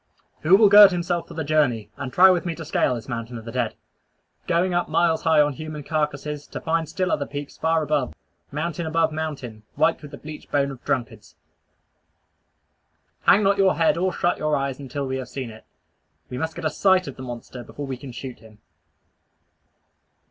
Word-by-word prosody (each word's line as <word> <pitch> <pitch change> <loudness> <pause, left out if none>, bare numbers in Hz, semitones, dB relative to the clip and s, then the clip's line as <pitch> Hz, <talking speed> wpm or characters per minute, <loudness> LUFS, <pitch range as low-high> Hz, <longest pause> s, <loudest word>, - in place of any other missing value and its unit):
Who 170 +5 +5
will 210 +1 +7
gird 205 0 +10
himself 175 -1 -2
for - - -11
the 160 - -2
journey, 145 -8 +1
and 135 -2 -6
try 190 +5 +7
with 180 -2 +1
me 170 -2 -3
to 160 - -8
scale 125 - +1
this 115 - -8
mountain 120 -1 -5
of 115 - -10
the 115 - -6
dead 120 -2 -1 0.7
going 175 +2 +1
up 175 -2 0
miles 165 0 +2
high 160 -1 +3
on 145 -1 +2
human 155 0 -7
carcasses, 150 -1 -2
to - - -6
find 160 -1 -1
still 185 +1 -1
other 140 - -1
peaks 145 0 -7
far 160 0 +1
above, 150 -4 -1 0.4
mountain 160 +3 -3
above 160 0 +1
mountain, 145 -8 -5
white 160 +1 +2
with 150 - -10
the - - -10
bleached 150 0 -10
bones 140 -1 +1
of 125 -3 -11
drunkards! 115 -5 -3 1.9
Hang 210 - +6
not 200 0 +2
your 190 -1 +4
head 160 -2 +3
or 185 +2 0
shut 175 0 0
your 155 -1 +1
eyes 135 -1 -2
until 140 +1 -4
we 130 0 -2
have 130 -2 -6
seen 130 -4 -5
it. 110 - -14 0.7
We 125 - -4
must 160 +2 -3
get - - -6
a 155 - +1
sight 190 -2 +3
at 140 - -6
the - - -10
monster 120 0 -8
before 145 - -7
we 135 -1 -4
can 130 +1 -10
shoot 125 +1 -8
him. 110 -1 -17
150 Hz, 200 wpm, -23 LUFS, 130-165 Hz, 1.9 s, gird